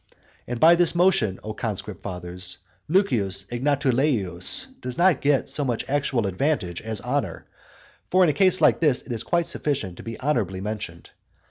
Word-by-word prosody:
And 125 -1 -4
by 165 +5 +7
this 170 0 +3
motion, 170 - +3
O 110 - -5
conscript 105 -3 -4
fathers, 90 0 -4 0.3
Lucius 115 - +1
Egnatuleius 130 - 0 0.2
does 125 -1 -6
not 175 -4 +4
get 140 -1 +2
so 145 - -2
much 120 -4 -2
actual 135 -5 0
advantage 95 - -1
as 110 -1 -3
honour. - - -2 0.6
For 185 +1 +4
in 175 - +4
a - - -5
case 185 +4 +3
like - - +5
this 150 -6 +2
it - - -9
is 115 -2 -1
quite 170 -1 0
sufficient 140 - -2
to - - -10
be 115 -1 -7
honourably 115 -10 -1
mentioned. 105 -4 -6
125 Hz, 165 wpm, -24 LUFS, 100-150 Hz, 0.6 s, by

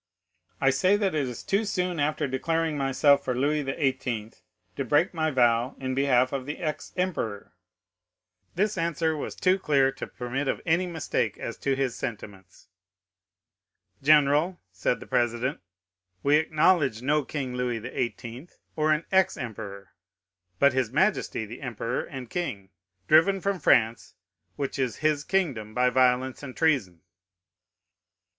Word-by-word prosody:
"'"I 135 - +4
say 190 +8 +3
that 200 -4 0
it 145 -4 0
is 125 -1 -7
too 200 +3 +1
soon 180 -5 -2
after 150 0 0
declaring 160 +4 -1
myself 140 +1 +3
for 125 - -1
Louis 145 +4 +1
XVIII. 130 -5 -2 0.4
to - - -2
break 150 +10 +2
my 160 -2 0
vow 120 -2 +2
in 130 -1 -3
behalf 130 -2 +3
of 135 -1 -3
the 150 - -4
ex 155 -4 -4
emperor." 135 - -2 1.0
This 205 +1 0
answer 165 -1 0
was 150 - -5
too 185 +1 +2
clear 140 -6 +3
to 135 - -7
permit 130 +3 -4
of - - 0
any 175 +2 +2
mistake 165 -3 -2
as - - -5
to 135 -1 0
his 135 -2 -1
sentiments. 100 -4 -8 1.3
"General," 150 +4 +4
said 90 -2 -1
the - - -8
president, 120 +3 0 0.6
"we 145 +1 +5
acknowledge 155 -6 +2
no 150 +2 +2
King 135 -2 -4
Louis 125 -1 -1
XVIII., 120 +4 -5 0.3
or 155 0 +2
an 155 +2 +1
ex 190 -1 +3
emperor, 100 - -7 0.7
but 140 +5 +4
his 130 -4 0
majesty 155 - +1
the 115 +3 -10
emperor 120 -1 -3
and 130 -2 -8
king, 115 - -4 0.4
driven 180 +6 +5
from 195 0 -1
France, 115 -5 +2 0.4
which 140 -1 -4
is 125 -4 0
his 150 -1 +2
kingdom, 135 - -1
by 125 0 +3
violence 130 0 +2
and 130 -3 -9
treason." 125 - +1
135 Hz, 145 wpm, -26 LUFS, 125-160 Hz, 1.3 s, we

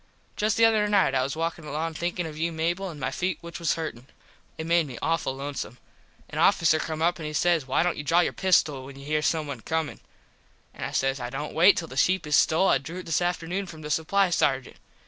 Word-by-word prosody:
Just 210 0 0
the 230 - +6
other 215 -2 +3
night 200 -9 +3
I 130 - +2
was 135 +2 -2
walkin 165 0 -3
along 155 +2 -3
thinkin 175 +2 -2
of 155 -1 -7
you 165 +2 -1
Mable 170 +4 -1
an 160 - -8
my 140 - -2
feet 180 -3 -2
which 170 0 -8
was 165 -3 +1
hurtin. 145 -6 -6 0.5
It 160 - -4
made 170 -1 +2
me 125 -3 -8
awful 165 -5 -1
lonesome. 135 -3 -5 0.5
An - - -5
officer 160 -1 +4
come 160 0 -3
up 175 +1 +1
and 155 - -4
he 155 - -5
says 165 -3 +2
why 130 - +2
dont 180 - 0
you 145 - -4
draw 165 +5 +4
your - - 0
pistol 160 -8 +2
when 135 0 -11
you 140 - -11
here 150 +1 0
someone 150 -5 -1
comin. 160 +2 -2 0.7
An - - -8
I - - -3
says 135 0 0
I 120 -1 -4
dont 145 +4 -5
wait 180 +5 +6
till 165 - -2
the 130 - -9
sheep 185 +5 +2
is 150 0 +2
stole 165 +5 +4
I 135 - +4
drew 160 +7 -8
it - - -14
this 165 +1 0
afternoon 175 +2 -2
from 160 -2 -10
the 150 - -5
Supply 185 +4 +2
sargent. 135 -5 0
160 Hz, 245 wpm, -26 LUFS, 145-175 Hz, 0.7 s, the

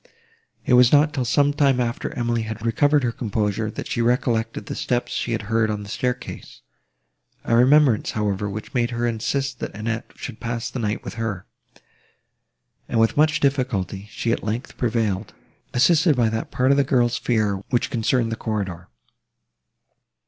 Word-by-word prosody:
It - - +2
was 125 -1 +6
not 150 +1 +4
till 130 -3 -1
some 145 +4 +3
time 140 -3 +3
after 120 -1 -2
Emily 120 -1 0
had 110 0 -6
recovered 145 +5 +3
her 120 - +1
composure, 110 -2 -2
that - - -6
she 120 - -1
recollected 115 -2 0
the - - -5
steps 120 -1 -1
she 120 - -2
had 115 -2 -1
heard 110 +1 +1
on 105 -1 -3
the 100 - -10
staircase—a 60 - -6
remembrance, 130 -1 +4
however, 105 -1 -1
which 105 +2 -7
made 120 -2 +1
her 120 0 -2
insist 125 +3 -2
that - - -5
Annette 110 +1 -3
should 125 -5 -8
pass 115 -1 -3
the 130 - -4
night 105 -2 -2
with - - -6
her, 105 -5 -3 1.4
and, 115 - +1
with 115 0 +3
much 150 +1 +3
difficulty, 110 -8 -1
she, 115 +1 -2
at - - -1
length, 110 +5 -4
prevailed, 110 -5 -1 0.4
assisted 155 +4 +4
by 120 -3 +2
that 110 0 -3
part 130 +2 +2
of 140 - +4
the 140 - +4
girl's 120 -3 +1
fear, 110 -4 +1
which 120 - 0
concerned 115 0 +1
the - - -1
corridor. 95 -6 -4
115 Hz, 170 wpm, -23 LUFS, 110-125 Hz, 1.4 s, was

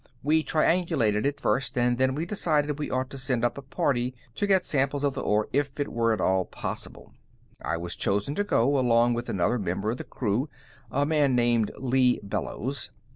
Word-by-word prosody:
We 155 +3 +3
triangulated 155 - +2
it 145 - -3
first, 135 -1 0
and 120 0 +2
then 130 0 +2
we 160 +3 -2
decided 150 -6 0
we 150 - -3
ought 130 +1 -2
to 135 - -6
send 125 -3 0
up 120 - 0
a 140 - -7
party 130 -2 -1 0.2
to 205 - -1
get 190 -2 +3
samples 140 0 0
of 140 -2 +1
the - - -4
ore 105 +1 +1
if 145 +1 -1
it 145 - -1
were 115 -1 +2
at 110 - 0
all 95 0 +2
possible. - - -6 0.5
"I 80 - -1
was 85 +1 -4
chosen 105 +7 0
to 205 - 0
go, 140 - +2
along 120 -1 +3
with 120 +1 -4
another 105 +6 +1
member 100 +2 -1
of 120 - -4
the - - -6
crew, 125 +5 -2 0.4
a 140 +5 +1
man 145 -4 +2
named 120 -2 +2
Lee 130 -1 +2
Bellows. 125 +6 -3
130 Hz, 200 wpm, -27 LUFS, 115-145 Hz, 0.5 s, We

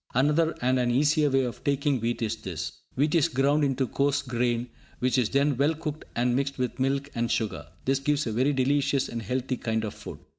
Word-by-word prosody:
Another 150 +5 +3
and 130 +1 +3
an 125 -1 +1
easier 150 +4 +3
way 135 -1 +2
of 120 -2 -5
taking 140 -1 +1
wheat 115 +1 -1
is 110 0 -1
this. 80 -5 -5 0.2
Wheat 145 +3 +1
is 165 -2 +4
ground 140 +1 +2
into 135 -1 +1
coarse 140 +2 0
grain, 120 -1 -1 0.3
which 130 +1 +1
is 120 - +1
then 140 0 +2
well 145 +4 +2
cooked 155 -1 -5
and 120 +1 +1
mixed 140 +1 -1
with 125 -1 -2
milk 135 +2 0
and 120 0 -1
sugar. 80 -10 -2 0.2
This 135 +1 +2
gives 145 +1 0
a 115 - -2
very 130 +6 +2
delicious 140 0 +1
and 115 - -4
healthy 130 +3 -2
kind 110 -1 -1
of 105 - -4
food. - - -9
135 Hz, 215 wpm, -27 LUFS, 120-145 Hz, 0.3 s, is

